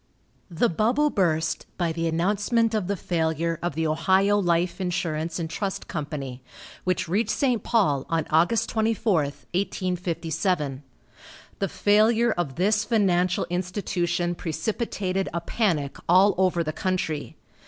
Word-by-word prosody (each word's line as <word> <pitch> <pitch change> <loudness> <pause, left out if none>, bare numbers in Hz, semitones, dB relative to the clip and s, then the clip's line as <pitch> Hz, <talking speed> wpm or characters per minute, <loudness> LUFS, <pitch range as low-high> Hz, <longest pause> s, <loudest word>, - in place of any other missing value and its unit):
The 175 +7 +2
bubble 245 - +2
burst 160 -5 0
by 170 -2 0
the 165 0 -2
announcement 205 +7 +1
of 210 -5 0
the 200 - 0
failure 165 -1 -1
of 175 -4 -2
the 160 0 0
Ohio 190 +6 +3
Life 175 0 0
Insurance 165 -3 -2
and 165 -2 -2
Trust 195 +4 -4
Company, 140 -5 -5 0.4
which 185 -1 0
reached 205 +6 0
St. 245 -2 +1
Paul 185 - +1
on 165 -1 +1
Aug. 170 +10 +2
24, 220 -1 +1
1857. 175 -3 -2 0.8
The 195 - 0
failure 220 +3 +3
of 165 -9 -2
this 210 +4 +2
financial 185 -5 +2
institution 175 -1 -1
precipitated 190 +2 -2
a 170 - -1
panic 165 -8 -1
all 190 +3 +6
over 180 -2 +2
the 155 -1 -3
country. 180 -5 -2
180 Hz, 130 wpm, -25 LUFS, 165-205 Hz, 0.8 s, all